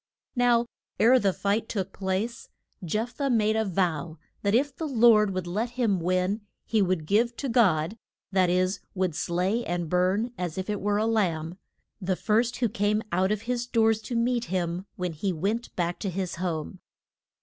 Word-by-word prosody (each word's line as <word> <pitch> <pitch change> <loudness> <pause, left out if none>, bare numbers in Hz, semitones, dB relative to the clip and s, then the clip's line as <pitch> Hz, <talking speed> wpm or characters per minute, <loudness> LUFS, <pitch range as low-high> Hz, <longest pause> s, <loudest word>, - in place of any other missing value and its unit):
Now 240 -1 +3 0.3
ere 250 +3 +6
the 200 -3 +2
fight 205 +4 -1
took 195 -3 -3
place, 195 +5 -3 0.3
Jeph 215 +8 -1
thah 275 +1 -2
made 220 -3 +2
a 220 - +2
vow 170 -5 -1 0.2
that 200 +1 +2
if 275 +2 +1
the 320 - -3
Lord 225 -5 +5
would 185 -1 -3
let 210 +7 -2
him 215 -7 +2
win 185 +4 0 0.2
he 220 -2 +2
would 185 -4 0
give 230 +7 +2
to 280 - -3
God 205 -5 +2 0.3
that 185 -2 +3
is, 185 +2 +1 0.2
would 185 -3 0
slay 180 +9 0
and 175 -4 -3
burn 185 +6 +2
as 175 -2 -3
if 190 +2 -2
it 205 - -3
were 205 0 +1
a 215 - +1
lamb 180 -6 0 0.4
the 185 0 0
first 230 +5 +1
who 245 - +1
came 210 0 0
out 185 +3 +2
of 210 0 -1
his 245 0 -2
doors 225 -2 +2
to 240 - -5
meet 240 0 +1
him 180 0 -2
when 180 -2 -3
he 190 +5 -1
went 200 +8 -2
back 175 -1 -1
to 200 - -2
his 185 -1 -3
home. 170 0 -3
200 Hz, 185 wpm, -27 LUFS, 180-230 Hz, 0.4 s, ere